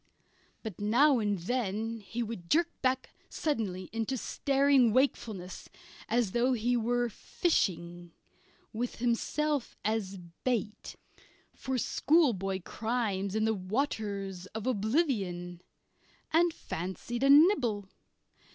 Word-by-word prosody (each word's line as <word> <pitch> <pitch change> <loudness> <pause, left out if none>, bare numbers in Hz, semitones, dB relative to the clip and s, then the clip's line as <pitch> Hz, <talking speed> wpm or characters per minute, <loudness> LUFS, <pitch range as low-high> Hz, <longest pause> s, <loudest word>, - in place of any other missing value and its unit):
But 215 -4 -7
now 250 +6 +4
and 205 -2 0
then 225 +3 -2
he 225 +3 -4
would 210 -7 -7
jerk 340 +2 +3
back 260 0 0 0.2
suddenly 200 - -2
into 225 +3 -1
staring 275 -2 +3
wakefulness 220 -8 -1 0.4
as 235 -4 +1
though 245 +4 +2
he 245 +1 +1
were 240 +1 +1
fishing 175 - -1 0.6
with 235 +3 -3
himself 260 +4 -1
as 210 -3 -1 0.3
bait 225 -4 -2 0.6
for 265 -1 -3
schoolboy 220 - +2
crimes 215 -4 -2
in 220 0 +2
the 220 - +2
waters 200 -3 -3
of 220 - -4
oblivion 205 - 0 0.7
and 340 +1 +4
fancied 190 - -5
a 275 - +3
nibble. 280 - +5
225 Hz, 105 wpm, -30 LUFS, 195-255 Hz, 0.7 s, nibble